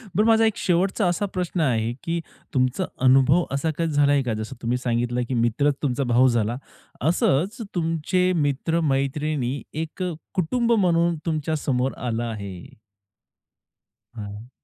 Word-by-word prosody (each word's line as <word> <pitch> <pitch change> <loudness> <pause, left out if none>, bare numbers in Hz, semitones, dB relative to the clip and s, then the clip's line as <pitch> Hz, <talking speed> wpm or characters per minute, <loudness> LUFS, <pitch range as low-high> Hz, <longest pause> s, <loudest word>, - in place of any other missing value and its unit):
बरं 210 - +3
माझा 225 0 +5
एक 220 - +1
शेवटचा 185 +2 +1
असा 175 +4 0
प्रश्न 180 -2 -3
आहे, 115 -4 +1
की 170 0 -1 0.3
तुमचा 130 +7 +1 0.2
अनुभव 135 +6 +5
असा 140 +4 0
काही 165 -1 0
झालाय 145 -1 +3
का? 120 -3 -1
जसं 110 +5 -5
तुम्ही 120 +1 0
सांगितलं 120 0 -1
की - - -1
मित्रच 120 +5 +2
तुमचा 135 0 0
भाऊ 125 +2 +5
झाला. 120 -1 +1 0.4
असंच, 175 - +1
तुमचे 175 +2 +1
मित्र-मैत्रिणी 140 -2 0 0.2
एक 165 +4 -6
अ, 180 - -2 0.2
कुटुंब 230 +7 0
म्हणून 170 -5 +3
तुमच्या 155 -1 -1
समोर 130 -3 0 0.2
आलं 115 +1 -1
आहे? 100 -5 -5 1.6
हं. 105 +3 -8
145 Hz, 140 wpm, -24 LUFS, 125-170 Hz, 1.6 s, माझा